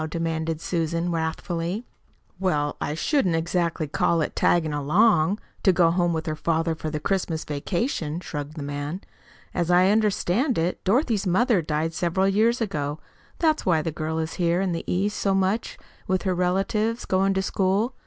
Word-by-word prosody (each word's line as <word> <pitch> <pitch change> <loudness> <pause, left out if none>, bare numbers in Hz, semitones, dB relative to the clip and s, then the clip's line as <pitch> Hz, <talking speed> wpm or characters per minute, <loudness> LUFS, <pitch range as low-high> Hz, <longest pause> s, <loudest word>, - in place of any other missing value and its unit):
demanded 160 -1 -2
Susan 170 0 -1
wrathfully. 170 +5 -2 0.5
"Well, 150 -6 0
I 150 - -2
shouldn't 185 - +1
exactly 170 -1 0
call 165 +3 +1
it - - -3
'taggin' 160 -3 +2
along' 165 +5 +3 0.2
to 190 - +5
go 170 -2 +4
home 175 0 +1
with 160 -1 -2
her 155 - -2
father 165 +1 0
for 160 -1 -5
the 150 0 -3
Christmas 170 -1 -1
vacation," 160 - -2
shrugged 150 -3 -6
the 150 - -5
man. 145 +5 -4 0.5
"As 175 -1 -1
I 180 +2 +5
understand 215 - +1
it, 170 +2 -1
Dorothy's 215 - +1
mother 205 +2 +3
died 155 +1 -1
several 175 +3 +1
years 225 +5 +2
ago. 150 -8 -2 0.4
That's 315 -2 +2
why 165 -4 +2
the 165 - -2
girl 160 +1 -3
is 160 0 -2
here 170 +1 +2
in 190 -1 0
the 165 - -3
East 200 +3 0
so 195 -1 +1
much 195 +4 0 0.3
with 185 0 0
her 190 -2 +1
relatives, 195 +6 0
going 195 +1 +2
to 190 - +1
school. 195 +6 +1
175 Hz, 170 wpm, -25 LUFS, 160-195 Hz, 0.5 s, to